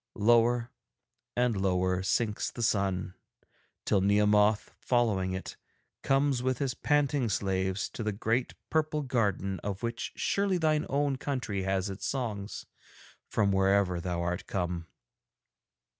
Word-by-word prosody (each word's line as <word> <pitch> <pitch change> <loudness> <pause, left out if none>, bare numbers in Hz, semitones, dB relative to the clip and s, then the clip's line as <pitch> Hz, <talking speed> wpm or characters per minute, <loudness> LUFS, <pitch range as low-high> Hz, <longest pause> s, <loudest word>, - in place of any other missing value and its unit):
Lower 120 +2 +3 0.7
and 125 -2 +2
lower 95 -1 +1
sinks 105 +3 0
the 120 - -5
sun, 95 -4 0 0.7
till 100 - +3
Nehemoth, 105 +1 +3
following 105 -7 +1
it, 95 - -6 0.4
comes 135 -2 +2
with 130 0 0
his 135 -2 -1
panting 145 -3 +1
slaves 95 0 0
to - - -7
the 110 -1 0
great 110 +5 -1 0.2
purple 155 -1 +1
garden 100 -7 0
of 100 +1 -5
which 115 0 -3
surely 195 -2 +1
thine 155 -2 +1
own 140 -1 +1
country 125 -9 -2
has 95 0 0
its 95 - -5
songs, 110 -6 -3 0.6
from 100 -2 +2
wherever 95 -2 +2
thou 85 -1 -2
art 90 +1 -3
come. 90 -3 -2
105 Hz, 130 wpm, -30 LUFS, 95-125 Hz, 0.7 s, Lower